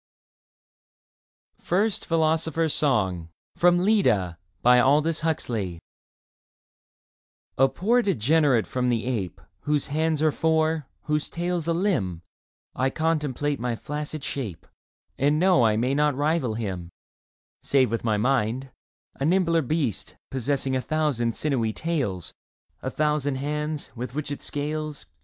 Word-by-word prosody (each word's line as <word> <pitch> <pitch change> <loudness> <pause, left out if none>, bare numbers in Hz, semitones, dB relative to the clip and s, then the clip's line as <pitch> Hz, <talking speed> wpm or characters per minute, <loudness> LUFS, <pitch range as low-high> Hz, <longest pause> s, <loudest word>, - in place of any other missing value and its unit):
n. - - -31
First 200 +3 0
Philosopher's 160 -1 +1
Song 95 - +1 0.3
31 175 +1 +4
FIRST 105 - +2 0.3
PHILOSOPHER'S 145 +6 +4 0.2
SONG 95 -8 -3 1.8
A 135 0 +6
POOR 235 +7 +2
degenerate 145 - +3
from 125 -1 -1
the 115 -2 0
ape, 105 -9 -3 0.2
Whose 150 -1 -1
hands 155 +1 0
are 155 - +4
four, 160 -1 +1 0.2
whose 150 0 -1
tail's 175 -1 -2
a 170 - +2
Hmb, 160 - 0 0.5
I 130 +1 +1
contemplate 145 -2 -1
my 120 -1 -1
flaccid 150 +3 -5
shape 110 - -5 0.5
And 145 +3 +3
know 180 -6 +4
I 110 -2 +3
may 125 +4 +1
not 150 0 +2
rival 145 -5 0
him, 95 -6 -4 0.7
Save 130 -5 +2
with 115 - -2
my 110 -2 +1
mind 125 +2 0 0.2
— - - -53
a - - -1
nimbler 165 0 +3
beast 140 - -2 0.2
Possessing 135 0 0
a 130 - 0
thousand 135 -7 0
sinewy 125 -7 0
tails, 130 - -2 0.5
A - - -2
thousand 150 -2 0
hands, 150 +2 -3
with 125 +1 -6
which 150 -1 -3
it 145 - -5
scales. 150 0 -4
145 Hz, 130 wpm, -25 LUFS, 120-160 Hz, 1.8 s, A